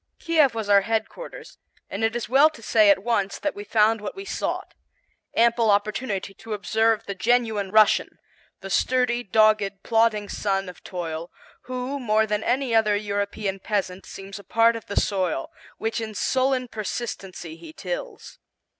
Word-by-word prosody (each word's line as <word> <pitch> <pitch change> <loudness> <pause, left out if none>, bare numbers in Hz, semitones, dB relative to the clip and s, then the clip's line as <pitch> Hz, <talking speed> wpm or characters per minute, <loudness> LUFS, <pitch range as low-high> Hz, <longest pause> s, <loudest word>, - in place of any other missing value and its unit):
Kiev 310 -7 +3
was 220 -2 -3
our 200 -1 +6
headquarters, 445 - -4 0.3
and 200 +3 -4
it 225 +1 +1
is 240 - -3
well 275 +5 +6
to 270 -8 -15
say 215 -1 +5
at 195 -1 +4
once 205 -4 0
that 300 - -2
we 205 - -7
found 215 +1 +2
what 210 - -5
we 390 0 -7
sought, - - -3 0.6
ample 235 -1 +3
opportunity 205 -1 0
to 220 +2 -8
observe 220 +2 +1
the 200 - -4
genuine 220 -2 +1
Russian, 215 +1 +4 0.4
the 195 - -7
sturdy, 250 +2 +2
dogged, 210 -2 +2
plodding 225 -2 +2
son 195 -2 -1
of 180 - -13
toil, 170 -2 -5 0.4
who, 255 +2 -4
more 220 -3 +2
than 210 0 -1
any 255 0 0
other 215 -2 +4
European 205 -1 -2
peasant 190 -2 -3
seems 195 +1 -9
a - - -12
part 230 +4 +3
of 225 - -8
the 200 - +1
soil, 185 -8 -1 0.3
which 225 +1 -2
in 220 -1 -6
sullen 260 +2 +1
persistency 195 -6 -5
he 165 -1 -12
tills. 180 0 -6
215 Hz, 165 wpm, -24 LUFS, 200-235 Hz, 0.6 s, our